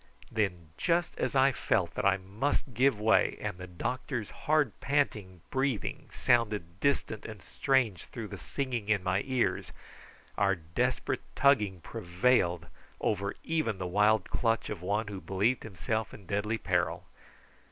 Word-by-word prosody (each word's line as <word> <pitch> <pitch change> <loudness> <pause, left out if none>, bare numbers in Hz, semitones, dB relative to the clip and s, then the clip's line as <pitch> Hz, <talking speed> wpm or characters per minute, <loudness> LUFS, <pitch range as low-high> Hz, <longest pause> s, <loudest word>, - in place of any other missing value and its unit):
Then 90 -7 -1
just 170 0 +1
as - - -1
I 135 +1 +6
felt 95 -7 0
that - - -2
I 95 -1 +5
must 110 +8 -2
give 125 0 +3
way, 110 +1 +3
and 90 - -4
the 90 - -7
doctor's 120 - -3
hard 150 -6 +1
panting 105 - 0
breathing 130 -4 -1
sounded 105 -7 +1
distant 125 -5 0
and 110 -2 -8
strange 130 - +1
through - - -7
the - - -6
singing 125 -6 -3
in 100 -3 +2
my 95 +1 +1
ears, 130 -3 0 0.7
our 100 -1 +3
desperate 120 +10 -1
tugging 105 -10 +3
prevailed 90 -1 +1 0.3
over 100 -1 -1
even 155 -11 0
the 95 - -4
wild 105 +4 +3
clutch 115 -2 +1
of 100 -5 -5
one 105 +4 0
who 100 -2 -6
believed 105 +6 +1
himself 110 +2 -3
in 100 - -14
deadly 105 +4 -1
peril. - - 0
105 Hz, 145 wpm, -30 LUFS, 95-130 Hz, 0.7 s, I